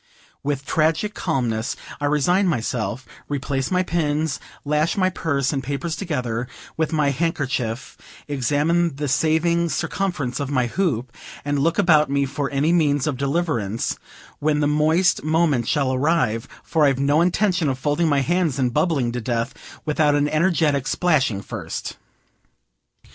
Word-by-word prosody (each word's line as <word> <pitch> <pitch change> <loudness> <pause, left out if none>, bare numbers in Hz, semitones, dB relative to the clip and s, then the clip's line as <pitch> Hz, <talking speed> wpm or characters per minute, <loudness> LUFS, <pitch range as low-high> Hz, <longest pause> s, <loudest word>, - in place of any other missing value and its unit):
With 140 -1 -2
tragic 160 +8 +1
calmness 120 - -1 0.2
I 145 - -1
resign 175 +7 +2
myself, 120 - -2 0.2
replace 135 -2 -2
my 185 0 +2
pins, 155 -3 -1 0.3
lash 150 +5 +1
my 185 -1 +2
purse 140 -5 -1
and 135 -2 -2
papers 140 +5 -3
together, 125 - -3 0.3
with 160 0 -1
my 150 -3 +2
handkerchief, 135 -5 -2 0.3
examine 145 +4 +1
the 145 +1 -3
saving 160 +5 +2
circumference 160 -6 -2
of 140 -2 -3
my 130 -3 +1
hoop, 125 - -1 0.3
and 145 0 0
look 165 +4 +1
about 155 -7 +4
me 140 0 +1
for 135 +1 -3
any 145 +4 +1
means 145 -5 +2
of 150 - -1
deliverance 135 - -1 0.4
when 150 0 +1
the 150 - +2
moist 155 +4 +2
moment 155 -6 +2
shall 140 -3 +1
arrive; 130 -5 +1 0.2
for 155 -2 +2
I've 135 -2 +2
no 145 +3 +3
intention 180 -2 +2
of 130 - -1
folding 145 +4 +1
my 140 -2 +3
hands 170 -2 +1
and 125 -3 0
bubbling 140 -9 +1
to 125 0 -3
death 115 +2 -2 0.3
without 150 -1 +2
an 145 0 +2
energetic 155 -4 +1
splashing 140 - +1
first. - - -5
145 Hz, 150 wpm, -22 LUFS, 135-165 Hz, 0.4 s, about